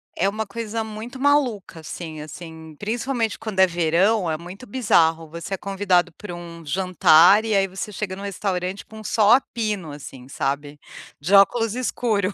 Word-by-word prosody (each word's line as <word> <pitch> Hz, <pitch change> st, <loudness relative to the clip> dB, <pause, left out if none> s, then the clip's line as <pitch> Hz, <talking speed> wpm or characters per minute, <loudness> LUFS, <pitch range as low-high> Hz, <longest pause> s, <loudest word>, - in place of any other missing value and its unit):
É 190 Hz, -, +1 dB
uma 215 Hz, +1 st, -2 dB
coisa 225 Hz, +1 st, -4 dB
muito 220 Hz, +4 st, -8 dB
maluca, 260 Hz, -, +1 dB
assim 160 Hz, -1 st, -7 dB
assim, 160 Hz, 0 st, -10 dB
principalmente 230 Hz, +1 st, -2 dB
quando 210 Hz, -4 st, -5 dB
é 190 Hz, -, +7 dB
verão 175 Hz, +3 st, +2 dB
é 155 Hz, -, -1 dB
muito 180 Hz, +8 st, -10 dB
bizarro, 165 Hz, -9 st, +2 dB
você 170 Hz, +4 st, -7 dB
é -, -, -1 dB
convidado 185 Hz, -3 st, +1 dB
pra 195 Hz, +1 st, -9 dB
um 170 Hz, -1 st, -9 dB
jantar, 180 Hz, +3 st, +5 dB
e 220 Hz, -2 st, +1 dB
aí 195 Hz, 0 st, +3 dB
você 190 Hz, +3 st, -6 dB
chega 190 Hz, -1 st, -4 dB
no 195 Hz, -, -9 dB
restaurante 190 Hz, -1 st, -3 dB
com 220 Hz, 0 st, -11 dB
sol 215 Hz, 0 st, +3 dB
a 250 Hz, -, +8 dB
pino 210 Hz, -, -4 dB
assim, 135 Hz, -3 st, -10 dB
sabe. 145 Hz, +2 st, -3 dB, 0.4 s
De 165 Hz, +7 st, -2 dB
óculos 225 Hz, +3 st, +4 dB
escuro. 220 Hz, -5 st, -1 dB
195 Hz, 170 wpm, -23 LUFS, 170-220 Hz, 0.4 s, a